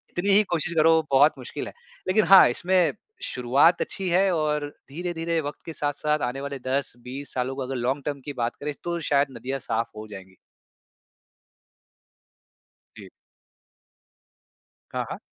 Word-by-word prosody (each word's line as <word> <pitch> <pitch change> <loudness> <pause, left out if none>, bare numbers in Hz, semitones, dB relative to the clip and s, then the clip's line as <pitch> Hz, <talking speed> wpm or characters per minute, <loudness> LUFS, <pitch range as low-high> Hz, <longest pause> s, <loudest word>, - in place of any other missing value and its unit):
कितनी 185 +3 0
ही 205 +2 +6
कोशिश 170 +2 -2
करो, 160 +1 +5
बहुत 140 +3 +5
मुश्किल - - -6
है। - - -9 0.4
लेकिन 215 +2 +4
हाँ, 190 +2 +9
इसमें 175 +5 +2 0.3
शुरुआत 135 +8 +3
अच्छी 190 -2 -3
है 190 +2 +3
और 150 -2 0 0.2
धीरे-धीरे 165 +1 -2
वक़्त 145 0 -6
के 165 - -6
साथ-साथ 150 +1 -1
आने 135 - -7
वाले 140 -1 -5
10-20 130 +1 -3
सालों 130 +1 -1
को 135 - -5
अगर 130 +1 -4
लॉन्ग 130 +3 -1
टर्म 145 -2 -3
की 145 - -5
बात 115 - -2
करें, 150 0 -3
तो 170 0 -2
शायद 145 -2 +2
नदियाँ 135 +4 -4
साफ़ 115 -1 -2
हो 110 0 -7
जाएँगी। 95 -2 -11 2.6
जी। - - -11 1.8
हाँ, - - -1
हाँ। - - -5
145 Hz, 150 wpm, -25 LUFS, 130-170 Hz, 2.6 s, हाँ